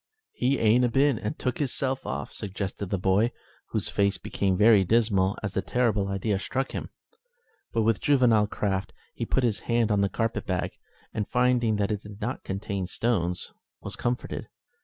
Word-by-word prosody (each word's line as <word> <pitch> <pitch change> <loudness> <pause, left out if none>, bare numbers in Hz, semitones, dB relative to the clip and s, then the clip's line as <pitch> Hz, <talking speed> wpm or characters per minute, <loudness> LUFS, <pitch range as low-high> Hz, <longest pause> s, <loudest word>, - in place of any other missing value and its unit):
"He 130 +3 +1
ain't 115 +3 +4
a 125 - +3
been 135 -1 +3
and 105 - -4
took 125 -2 -2
hisself 135 -1 -1
off?" 70 +2 -4
suggested 100 -1 -4
the 100 - 0
boy, 95 +6 +2 0.4
whose - - -1
face 100 -1 +1
became 95 -2 -1
very 105 -1 +6
dismal 100 -2 +2
as 100 - -2
the 95 - 0
terrible 110 -2 +1
idea 100 +1 -1
struck 135 +6 -2
him. - - -5 0.8
But, 115 - +1
with 110 -2 +2
juvenile 120 -7 +4
craft, 100 -2 -2 0.2
he - - -4
put 130 - +1
his 110 -4 +1
hand 115 -2 +2
on 100 -1 +3
the 100 - +2
carpet 115 +2 -2
bag, - - -1 0.4
and 105 -2 -2
finding 125 -3 +2
that 105 0 0
it 105 -1 -2
did 105 -1 -11
not 120 +5 -3
contain 100 -1 -3
stones, 90 -5 -1 0.3
was - - -5
comforted. 120 +1 -3
105 Hz, 180 wpm, -27 LUFS, 100-120 Hz, 0.8 s, very